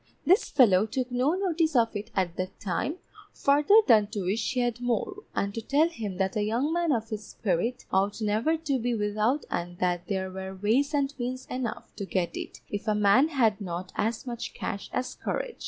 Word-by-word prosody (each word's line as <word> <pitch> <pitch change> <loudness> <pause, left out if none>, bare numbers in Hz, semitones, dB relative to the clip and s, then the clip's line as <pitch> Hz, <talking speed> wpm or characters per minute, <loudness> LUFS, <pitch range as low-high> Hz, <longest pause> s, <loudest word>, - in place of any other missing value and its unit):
This 375 +6 +4
fellow 215 -6 +5
took 255 +3 -3
no 255 +7 +2
notice 335 -5 0
of 230 -2 +3
it 205 +1 -4
at 180 -3 0
that 185 +1 -4
time, 205 - -2 0.4
farther 290 +7 +4
than 215 -5 +5
to 205 -2 -4
wish 210 +6 -1
he 250 - +1
had 240 0 -1
more, 245 - -1 0.2
and 200 0 -1
to 225 - -4
tell 290 +8 +3
him 210 - -5
that 190 0 0
a 210 - +1
young 235 +9 0
man 345 -2 +1
of 225 -3 0
his 215 -2 -4
spirit 210 +5 -2
ought 195 +3 +1
never 220 +9 +1
to 290 -5 -1
be 240 0 0
without 215 +6 0
and 175 0 -3
that 175 -1 -1
there 190 -2 -2
were 190 0 -6
ways 245 +10 +1
and 280 0 +1
means 255 +1 -3
enough 250 -3 -4
to 200 - -3
get 180 -3 -1
it, - - -7
if 205 +2 -4
a 215 - +2
man 210 +7 +5
had 230 -9 +2
not 185 0 -5
as 225 +3 -1
much 240 -2 -5
cash 200 -3 -4
as 255 - -2
courage. - - -4
225 Hz, 205 wpm, -28 LUFS, 200-270 Hz, 0.4 s, fellow